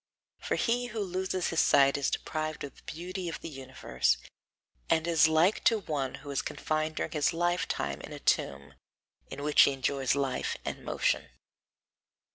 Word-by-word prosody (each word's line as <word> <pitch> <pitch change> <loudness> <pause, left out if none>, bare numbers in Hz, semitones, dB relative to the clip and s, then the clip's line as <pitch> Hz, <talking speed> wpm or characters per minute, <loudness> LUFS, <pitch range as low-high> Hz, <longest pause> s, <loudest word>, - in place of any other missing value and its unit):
For - - -1
he 245 +1 +1
who 225 -1 -5
loses 185 -1 -1
his 165 - 0
sight 140 0 +5
is 140 -1 +1
deprived 155 -1 -3
of 140 - -7
the - - -18
beauty 180 +2 -5
of 165 - -5
the - - -6
universe, 135 -3 -1 0.7
and 160 0 +3
is 165 -2 +5
like 160 +6 +3
to 225 - +5
one 140 -7 -2
who 145 - -5
is 140 - 0
confined 155 0 -2
during - - -2
his 150 0 +1
lifetime 170 - -1
in - - -9
a - - -6
tomb, 70 0 0 0.6
in 145 - -6
which 150 0 +5
he 140 - +6
enjoys 135 -1 0
life 135 -2 -1
and - - -4
motion. - - 0
155 Hz, 170 wpm, -30 LUFS, 140-175 Hz, 0.7 s, he